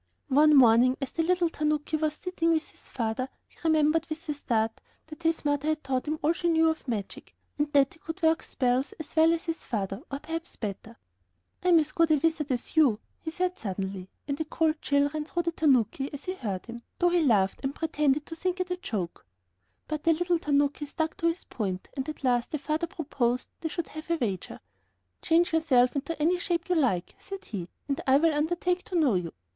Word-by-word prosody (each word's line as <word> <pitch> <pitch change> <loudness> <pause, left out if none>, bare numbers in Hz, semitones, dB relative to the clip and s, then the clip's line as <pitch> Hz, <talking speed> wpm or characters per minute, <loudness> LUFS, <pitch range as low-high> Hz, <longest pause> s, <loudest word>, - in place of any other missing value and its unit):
One 300 +3 +6
morning, 250 0 +6
as 270 -3 -4
the 330 - 0
little 350 +1 +2
tanuki 300 0 0
was 310 -1 0
sitting 335 -1 -1
with 320 -1 0
his - - -14
father, 235 +2 -2 0.2
he - - -24
remembered, 315 0 +3
with 315 +1 -6
a - - +1
start, 225 -6 -1 0.2
that 315 +1 -11
his 325 -2 0
mother 290 0 +1
had 310 0 0
taught 265 +1 -1
him 310 +1 -1
all 315 +3 +4
she 345 0 -1
knew 325 -1 +4
of 315 - -8
magic, 215 -5 -5 0.2
and 295 0 0
that 275 -2 +4
he 325 - -20
could 325 +3 -7
work 320 0 +4
spells 255 +1 0
as 315 0 -10
well 320 +1 +6
as 335 0 0
his 330 -1 -3
father, 200 -2 -3
or 275 - -2
perhaps 325 +3 -6
better. 215 +2 -6 0.7
"I - - 0
am 345 - +7
as 305 -1 -1
good 330 0 +3
a 310 - +6
wizard 310 0 0
as 245 +4 -3
you," 280 -9 +5 0.2
he 320 - -5
said 365 +2 -2
suddenly, 190 -2 -4 0.2
and 280 +1 -2
a - - -1
cold 310 0 0
chill 285 0 +3
ran 305 0 -4
through 345 +2 -2
the 335 - 0
tanuki 270 -4 +2
as 285 0 -8
he 370 - -2
heard 205 - -4
him, 235 0 -8 0.2
though 350 - +3
he 350 0 +3
laughed, 205 -9 +3
and 275 +1 -3
pretended 300 -2 +1
to 325 - -7
think 365 +2 -2
it 365 0 -2
a 360 - 0
joke. 185 - -4 0.6
But 305 -1 -3
the 330 - +5
little 350 +1 +1
tanaki 290 0 +1
stuck 320 +2 -2
to 335 - +1
his 335 +2 -1
point, 190 -6 -4
and 270 +1 -3
at 305 - -7
last 245 -2 +2
the 305 - -2
father 305 +4 -1
proposed 255 -6 -1
they 320 - -3
should 340 +1 -4
have 310 +1 -9
a 335 - +3
wager. 205 - -3 0.6
"Change 335 +1 +3
yourself 260 -6 +3
into 285 +4 -3
any 345 +4 +2
shape 345 -1 -1
you - - +3
like," 235 - +1
said 390 0 -8
he, 180 -5 -5 0.2
"and 280 -1 -1
I 265 +1 +6
will 325 +2 +3
undertake 350 +4 0
to 365 - -6
know 285 -8 +4
you. 175 -3 -1
300 Hz, 220 wpm, -28 LUFS, 255-330 Hz, 0.7 s, am